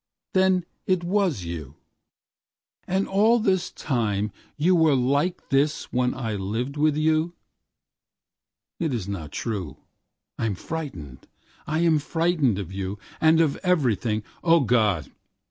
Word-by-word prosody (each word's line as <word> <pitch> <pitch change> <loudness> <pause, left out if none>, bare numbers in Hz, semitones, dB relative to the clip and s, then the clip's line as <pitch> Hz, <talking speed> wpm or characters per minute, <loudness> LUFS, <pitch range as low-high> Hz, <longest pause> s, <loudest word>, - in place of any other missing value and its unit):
—Then 185 -2 +3 0.2
it 185 -2 +2
was 180 - +1
you—And 85 - -8
all 215 +5 +4
this 190 -4 +1
time 105 -6 -1 0.3
you 175 +5 +3
wereLike 145 +1 +3
this 145 +2 +1
when 125 0 +1
I 115 -4 -3
lived 110 +8 -3
with 150 0 +2
you.It 160 -1 -5
is 105 -5 -4
not 90 -7 -5
true,I 105 - -6
am 105 - -1
frightened, 90 - -7 0.4
I 155 +2 0
am 165 -3 +4
frightened 160 - +1
of 95 -4 -5
youAnd 100 +12 0
of 150 -3 0
everything.O 135 - +1
God! 110 - +1
140 Hz, 110 wpm, -25 LUFS, 105-170 Hz, 0.4 s, all